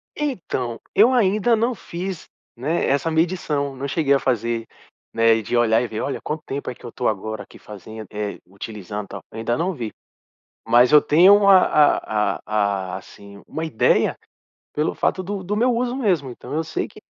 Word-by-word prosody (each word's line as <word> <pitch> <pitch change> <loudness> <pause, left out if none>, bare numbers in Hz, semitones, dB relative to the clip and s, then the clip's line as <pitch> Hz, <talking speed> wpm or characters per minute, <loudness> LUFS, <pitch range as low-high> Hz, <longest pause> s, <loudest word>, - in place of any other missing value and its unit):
Então, 160 - -3 0.2
eu 230 +5 +6
ainda 215 0 +3
não 235 +3 +1
fiz, 180 -2 -6 0.3
né, 150 +8 -1
essa 140 +4 +1
medição, 160 -4 0
não 135 +2 -4
cheguei 140 -1 +1
a 140 - +3
fazer, 115 -2 -1 0.5
né 115 0 +4
de 115 +3 -3
olhar 115 0 +3
e 125 - -2
ver: 110 - -5
"Olha, 140 - -3
quanto 155 +1 -4
tempo 140 0 -4
é 125 - -6
que - - -16
eu 120 - -7
tô 125 - -2
agora 110 0 -3
aqui - - -16
fazendo, 110 +2 -10
eh, 105 -1 -4
utilizando, 100 +1 -7
tal." 100 - -8
Eu - - -10
ainda 120 +2 -1
não 180 +2 -1
vi. 115 -7 -5 0.8
Mas 120 +3 +5
eu 150 -1 +8
tenho 200 +6 +6
a 195 -1 +9
a 105 -9 +2
a - - -21
a 100 -3 -1
assim 100 +1 -13
uma 160 - -4
ideia 155 -9 +2 0.6
pelo 150 +2 0
fato 185 - 0
do 195 0 -4
do 205 +3 -2
meu 245 +3 +2
uso 245 +1 -1
mesmo, 180 - 0
então, 125 - -9
eu 160 +2 0
sei 160 - -3
que - - -16
135 Hz, 190 wpm, -22 LUFS, 110-180 Hz, 0.8 s, a